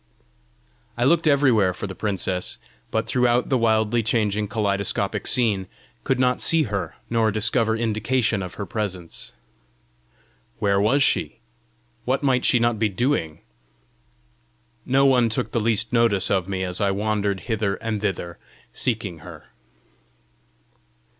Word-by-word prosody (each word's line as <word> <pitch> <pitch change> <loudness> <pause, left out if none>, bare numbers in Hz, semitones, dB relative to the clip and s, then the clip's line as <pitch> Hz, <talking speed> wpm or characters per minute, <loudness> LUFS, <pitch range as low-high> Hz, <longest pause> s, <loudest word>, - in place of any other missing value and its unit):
I 120 - 0
looked 165 +5 +3
everywhere 125 -11 +3
for - - -5
the 95 - -6
princess, 95 -3 -3 0.3
but 110 0 -1
throughout 120 +1 +1
the 130 - +3
wildly 110 0 +2
changing 105 -2 0
kaleidoscopic 100 -2 -1
scene, 105 -7 +1 0.4
could 135 - 0
not 125 -1 +1
see 165 -1 +3
her 100 -5 -4
nor 115 -1 +1
discover 110 +2 +1
indication 115 0 0
of 90 -2 -7
her 100 - -5
presence. 95 -6 -5 1.3
Where 100 -2 +1
was 135 +7 +3
she? - - +1 0.7
What 130 +3 -1
might 130 -2 +2
she - - +4
not 120 -2 +1
be 110 -1 +2
doing? 95 - -1 1.5
No 135 +2 +3
one 125 -4 +4
took 110 - -2
the 115 - 0
least 115 +1 0
notice 115 -5 +2
of 95 -2 0
me 95 -1 -2
as 90 +1 -3
I 100 - +2
wandered 100 -1 -1
hither 110 -4 -1
and 110 -2 -4
thither 85 -4 -3 0.3
seeking 105 -9 -2
her. - - -12
110 Hz, 135 wpm, -23 LUFS, 100-120 Hz, 1.5 s, she